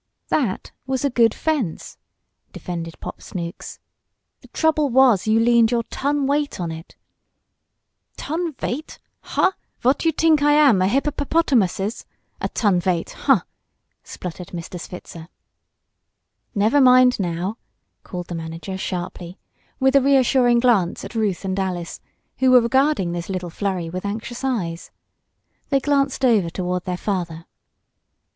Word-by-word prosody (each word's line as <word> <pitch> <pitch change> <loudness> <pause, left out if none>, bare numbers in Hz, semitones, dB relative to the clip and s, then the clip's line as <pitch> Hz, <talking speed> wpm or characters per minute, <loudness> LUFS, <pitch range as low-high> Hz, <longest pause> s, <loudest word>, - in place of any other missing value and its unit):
"That 240 -11 -1 0.2
was 265 +1 -1
a 280 - +1
good 230 -2 +4
fence!" 275 - -3 0.5
defended 165 -2 -6
Pop - - -8
Snooks. 170 -2 -7 0.6
"The - - -17
trouble 310 -2 +1
was 245 -6 +4
you 220 +1 +4
leaned 235 -1 +4
your 235 -1 0
ton 285 0 0
weight 285 -4 -1
on 170 -2 -3
it." 160 +1 -10 1.2
"Ton 330 +1 -3
veight! 275 +3 -5 0.2
Huh! - - +1 0.3
Vot 260 +3 +2
you 325 - +3
tink 315 -1 +3
I 295 0 +4
am? 285 -10 +5
A 185 - +3
hipperperpotamusses? 265 - 0 0.4
A - - -1
ton 205 -6 +1
veight 175 -2 -1
huh!" - - +2 0.6
spluttered 180 0 -7
Mr. 175 +1 -7
Switzer. 170 -3 -9 1.3
"Never 220 +8 +3
mind 255 -1 +6
now!" 180 +3 -2 0.4
called 180 -1 -6
the 175 - -7
manager 165 +3 -6
sharply, 180 0 -5 0.4
with 265 0 +3
a 275 - +7
reassuring 260 -3 +4
glance 210 -8 +2
at - - -9
Ruth 210 -5 -1
and 190 0 -2
Alice, 180 -3 -4 0.4
who 260 - +4
were 250 -1 +7
regarding 260 - +2
this 175 +1 -5
little 180 -2 -4
flurry 185 -2 -2
with 180 +2 -5
anxious 225 +5 -5
eyes. 180 -11 -2 0.8
They 275 - +3
glanced 275 -1 +1
over 215 -8 +3
toward 180 +1 -3
their 180 -1 -2
father. 170 -5 -3
220 Hz, 140 wpm, -22 LUFS, 180-265 Hz, 1.3 s, a